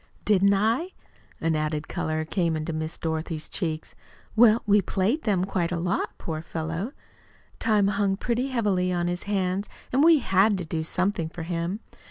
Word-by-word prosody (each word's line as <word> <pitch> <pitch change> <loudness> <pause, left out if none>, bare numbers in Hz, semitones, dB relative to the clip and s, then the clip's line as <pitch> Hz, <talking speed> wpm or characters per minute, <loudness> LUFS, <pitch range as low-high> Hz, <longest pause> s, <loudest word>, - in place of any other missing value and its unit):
"Didn't 200 -1 +4
I?" 230 - +1 0.5
An 165 0 +1
added 155 0 -1
color 155 0 -2
came 165 -1 0
into 155 +1 -3
Miss 155 +1 -4
Dorothy's 160 -1 -3
cheeks. 160 -4 -3 0.4
"Well, 225 0 +6
we 205 -1 +5
played 200 - 0
them 190 -4 +2
quite 180 -3 -1
a 180 - 0
lot. 180 +3 -1
Poor 155 -2 -4
fellow! 165 - -4 0.7
Time 210 -3 +3
hung 200 -1 +1
pretty 245 +4 -1
heavily 205 -8 +1
on 175 -1 0
his 175 0 -3
hands, 195 0 0 0.2
and 270 +3 +4
we 330 0 +7
HAD 200 -4 +3
to 180 - -4
do 160 0 -2
something 180 0 0
for 165 0 -7
him. 170 +5 -3
185 Hz, 170 wpm, -26 LUFS, 165-210 Hz, 0.7 s, we